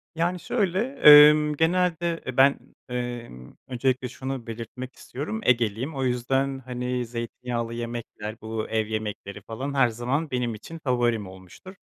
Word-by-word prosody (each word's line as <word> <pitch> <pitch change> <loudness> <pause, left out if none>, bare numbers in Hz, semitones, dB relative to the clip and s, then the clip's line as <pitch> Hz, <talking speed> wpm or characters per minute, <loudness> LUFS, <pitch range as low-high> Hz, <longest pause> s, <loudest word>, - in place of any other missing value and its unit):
Yani, 175 +2 0
şöyle, 195 -5 0 0.2
emm, 150 0 +9
genelde, 170 +1 +1
e, 130 0 -5
ben, 140 +1 +5 0.3
emm, 120 - -6
öncelikle 130 0 0
şunu 130 -1 -6
belirtmek 120 +3 -7
istiyorum, 155 - -5
Egeliyim 120 +4 +1
o 135 - -2
yüzden, 135 +2 0
hani, 125 -1 -3
zeytinyağlı 115 0 -4
yemekler, 115 -2 -6
bu, 110 0 -4
ev 110 -1 0
yemekleri 105 -2 -5
falan 130 +5 -5
her 135 -3 +4
zaman 130 +7 -2
benim 120 -3 -1
için 160 +10 -10
favorim 120 -5 +1
olmuştur. 95 - -13
125 Hz, 135 wpm, -25 LUFS, 115-140 Hz, 0.3 s, emm